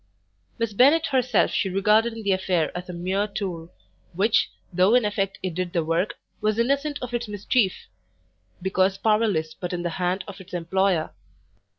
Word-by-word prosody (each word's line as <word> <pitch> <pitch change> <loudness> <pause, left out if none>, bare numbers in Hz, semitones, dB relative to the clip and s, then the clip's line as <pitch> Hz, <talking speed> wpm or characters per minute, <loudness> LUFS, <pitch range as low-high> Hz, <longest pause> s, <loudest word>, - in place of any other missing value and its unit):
Miss 230 -2 -2
Bennet 285 +9 +5
herself 255 -4 +2
she 195 - 0
regarded 210 +5 +3
in 225 -1 -8
the 200 - +1
affair 185 -4 0
as 180 +1 -6
a - - -3
mere 190 +4 -1
tool, 180 -5 -5 0.4
which, 205 +5 +2 0.2
though 185 +6 +4
in 250 -3 +4
effect 195 -2 -1
it 185 -2 -2
did 180 0 -3
the 170 -3 0
work, 165 +5 0 0.3
was 215 0 +1
innocent 280 +5 +1
of 250 -1 -6
its 240 -1 -2
mischief, 205 0 0 0.8
because 190 0 +1
powerless 210 -7 +1
but 180 +2 -5
in 175 -1 -3
the 175 - -2
hand 180 +1 0
of 200 -1 -9
its 185 -1 -9
employer. 175 -1 0
195 Hz, 175 wpm, -24 LUFS, 180-220 Hz, 0.8 s, Bennet